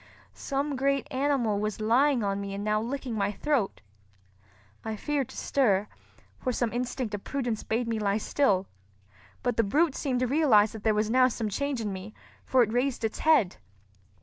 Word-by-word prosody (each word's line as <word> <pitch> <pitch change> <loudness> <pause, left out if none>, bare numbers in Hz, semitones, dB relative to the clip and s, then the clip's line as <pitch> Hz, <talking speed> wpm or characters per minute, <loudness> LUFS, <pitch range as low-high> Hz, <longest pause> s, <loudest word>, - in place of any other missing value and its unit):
Some 280 +1 -2
great 275 +1 +1
animal 260 -6 +1
was 210 0 -2
lying 245 +3 +3
on 200 0 -1
me 200 0 -5
and 200 - -4
now 215 0 +1
licking 255 +1 -4
my 200 -2 0
throat. 260 -2 -1 1.0
I 220 -1 -3
feared 280 +3 -2
to - - -11
stir, 210 -7 +1 0.5
for 255 - -1
some 240 -2 -1
instinct 245 -2 -3
of 205 - -4
prudence 245 -6 -2
bade 230 +2 -1
me 225 -1 -1
lie 200 -1 +1
still; 205 -4 +1 0.8
but 245 -2 0
the 230 - +4
brute 295 +9 +2
seemed 255 -4 -1
to - - +3
realize 245 -7 +4
that 220 - -8
there 220 -1 +2
was 215 +1 0
now 255 +1 +5
some 225 -3 -3
change 280 +3 -2
in 205 -3 -3
me, 190 +3 -8 0.3
for 255 -2 +4
it 220 -1 -3
raised 250 -1 0
its 220 - -2
head. 295 - +3
235 Hz, 185 wpm, -28 LUFS, 210-270 Hz, 1.0 s, now